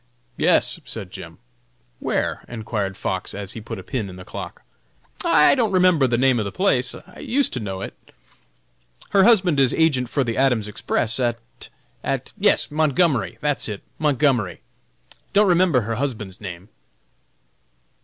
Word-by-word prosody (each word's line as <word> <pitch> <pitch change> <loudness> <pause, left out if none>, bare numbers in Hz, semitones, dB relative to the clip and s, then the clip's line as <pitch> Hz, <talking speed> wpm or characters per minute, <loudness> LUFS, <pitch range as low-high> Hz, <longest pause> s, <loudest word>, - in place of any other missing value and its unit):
"Yes," - - +2
said - - -7
Jim. - - -9 0.6
"Where?" - - -1
enquired 105 -4 -4
Fox, 95 0 -3
as 100 -1 -5
he 115 - -7
put 105 - -6
a - - -8
pin 115 -8 -3
in 90 - -10
the 90 0 -11
clock. - - -8 0.6
"I 150 - +5
don't 235 -6 +1
remember 180 -7 +4
the 120 -1 +1
name 130 -1 +3
of 105 - -1
the 100 - -4
place; 130 -10 +1 0.2
used 270 +1 0
to 125 - -2
know 95 -4 -5
it. - - -6 1.2
Her 195 -1 +5
husband 185 -10 +4
is 135 -3 +3
agent 135 -7 +2
for 140 - +1
the 115 -3 -3
Adams 125 -6 +2
Express 110 +3 -1
at 120 - -3 0.3
at - - -3
yes - - +3
Montgomery! 155 -2 +1
that's 145 -5 0
it, 105 -2 -6 0.2
Montgomery! 135 - +1 0.7
Don't 205 +1 +5
remember 175 -7 +4
her 115 +1 -3
husband's 110 -9 -4
name." 90 0 -8
125 Hz, 155 wpm, -22 LUFS, 105-155 Hz, 1.2 s, I